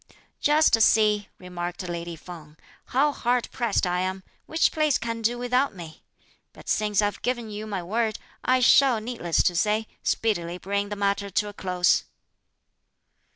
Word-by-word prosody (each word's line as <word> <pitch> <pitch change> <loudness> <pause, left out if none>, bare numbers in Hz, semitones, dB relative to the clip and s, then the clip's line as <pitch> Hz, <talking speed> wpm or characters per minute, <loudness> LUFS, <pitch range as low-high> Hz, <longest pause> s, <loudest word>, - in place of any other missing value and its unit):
"Just 295 -6 +4
see," 210 -2 +3
remarked 180 0 -6
lady 170 0 -5
Feng, 160 -2 -12 0.3
"how 285 +4 +2
hard 245 -3 0
pressed 235 -5 0
I 180 0 0
am; 185 +1 -3 0.2
which 320 - +2
place 305 -3 +2
can 230 -1 -4
do 235 +2 +1
without 250 0 0
me? 165 -3 -10 0.5
but - - -15
since 210 -1 +1
I've 205 0 -2
given 240 -3 -2
you 210 +1 -6
my 195 -4 -4
word, 220 +4 -1 0.3
I 255 0 +2
shall, 250 -1 +5
needless 215 -7 -1
to 175 - +1
say, 215 +4 +1 0.2
speedily 175 -6 -1
bring 200 +2 -2
the 205 - -4
matter 200 0 -1
to 205 +2 0
a - - -10
close." 180 -2 +1
210 Hz, 155 wpm, -25 LUFS, 180-235 Hz, 0.5 s, shall